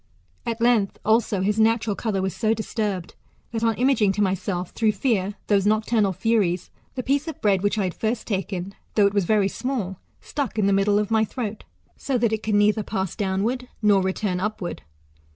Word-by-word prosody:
At 230 -1 -2
length 230 -4 +2
also 220 -3 +2
his 210 +3 +1
natural 220 -1 +2
colour 195 -4 -1
was 190 -2 -2
so 220 +3 +1
disturbed 210 -5 -3 0.4
that 225 -1 -3
on 225 -1 +2
imaging 240 -6 +3
to 210 - -1
myself, 185 -1 -2
through 220 -2 +1
fear, 205 -3 0
those 200 -1 +2
nocturnal 215 -1 +2
furies, 190 -2 0 0.2
the 255 - -3
piece 280 +4 0
of 320 - -6
bread 195 -3 +2
which 205 +2 0
I 205 - +1
had 180 -2 -2
first 225 +2 -2
taken, 190 -2 -3 0.2
though 205 - +5
it 200 - +2
was 200 -3 +2
very 205 0 +3
small, 200 -5 -3 0.2
stuck 275 -7 -4
in 210 - +2
the 200 - +3
middle 200 +1 +3
of 210 +1 -1
my 220 -1 +4
throat 220 -1 -4 0.3
so 270 -3 -1
that 230 -2 +1
it 220 - -1
could 215 -1 0
neither 210 +1 +3
pass 195 -3 -3
downward 215 +5 -1 0.2
nor 205 -2 +5
return 190 0 -1
up 210 +3 -2
ward. 175 - -5
210 Hz, 200 wpm, -24 LUFS, 195-225 Hz, 0.4 s, though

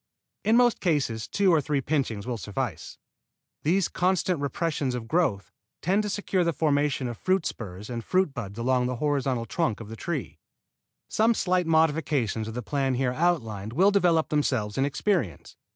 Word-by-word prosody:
In 225 +2 +4
most 245 -1 +4
cases 140 - 0
two 195 -3 +3
or 160 - +4
three 145 0 0
pinchings 130 -7 -1
will 120 -2 -3
suffice. 105 -4 -4 0.6
These 180 +4 +2
constant 180 -2 0
repressions 140 -2 -1
of 115 -2 -5
growth 105 - 0 0.3
tend 190 +5 +2
to 210 - -3
secure 195 -2 0
the 170 -1 +1
formation 145 -3 +1
of 120 -2 -6
fruit 185 -2 +1
spurs 100 -2 -6
and 120 -2 -5
fruit 185 -2 +1
buds 105 -5 -6
along 125 +1 +1
the 125 - -2
horizontal 135 -3 0
trunk 120 -1 -1
of 110 -2 -9
the 115 - -7
tree. 125 - -4 0.7
Some 225 +2 +2
slight 180 -3 +1
modifications 150 -9 +1
of 110 - -6
the 125 - -4
plan 135 +1 0
here 125 0 0
outlined 115 - -1
will 190 +8 +4
develop 175 -5 +3
themselves 130 -8 0
in 135 - +2
experience. 150 - -1
140 Hz, 170 wpm, -26 LUFS, 115-175 Hz, 0.7 s, In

